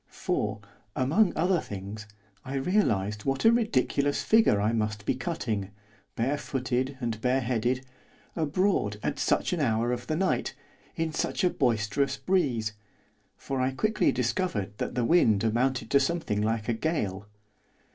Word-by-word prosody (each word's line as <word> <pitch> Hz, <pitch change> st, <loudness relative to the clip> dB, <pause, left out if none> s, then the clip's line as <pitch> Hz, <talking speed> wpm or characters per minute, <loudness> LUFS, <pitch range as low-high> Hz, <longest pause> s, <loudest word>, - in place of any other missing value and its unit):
For, 105 Hz, 0 st, -2 dB, 0.4 s
among 170 Hz, +10 st, +3 dB
other 175 Hz, +2 st, +2 dB
things, 105 Hz, -2 st, -7 dB, 0.4 s
I 135 Hz, +1 st, -5 dB
realised 110 Hz, -, +1 dB
what 135 Hz, +4 st, -1 dB
a 225 Hz, -, +8 dB
ridiculous 145 Hz, -, +1 dB
figure 220 Hz, -, +4 dB
I 105 Hz, +3 st, +1 dB
must 105 Hz, -1 st, -2 dB
be -, -, +2 dB
cutting, 110 Hz, -, -3 dB, 0.5 s
barefooted 130 Hz, 0 st, -1 dB
and 115 Hz, -3 st, -3 dB
bareheaded, 125 Hz, 0 st, 0 dB, 0.5 s
abroad, 160 Hz, -, +1 dB
at -, -, -2 dB
such -, -, +1 dB
an 175 Hz, -, -1 dB
hour 115 Hz, -3 st, +1 dB
of 125 Hz, 0 st, -4 dB
the 155 Hz, -, 0 dB
night, 190 Hz, +3 st, 0 dB, 0.4 s
in 160 Hz, -2 st, -2 dB
such -, -, -1 dB
a 180 Hz, -, +4 dB
boisterous 120 Hz, +1 st, 0 dB
breeze, 130 Hz, -, 0 dB, 0.6 s
for 135 Hz, -1 st, -3 dB
I 130 Hz, -, +2 dB
quickly 215 Hz, +9 st, +2 dB
discovered 120 Hz, -, -1 dB
that -, -, -3 dB
the 120 Hz, -2 st, +1 dB
wind 115 Hz, -, +4 dB
amounted 125 Hz, +4 st, 0 dB
to 140 Hz, -, +6 dB
something 135 Hz, -8 st, -1 dB
like 110 Hz, 0 st, -1 dB
a 120 Hz, -, +1 dB
gale. 105 Hz, -, -2 dB
130 Hz, 145 wpm, -28 LUFS, 110-160 Hz, 0.6 s, a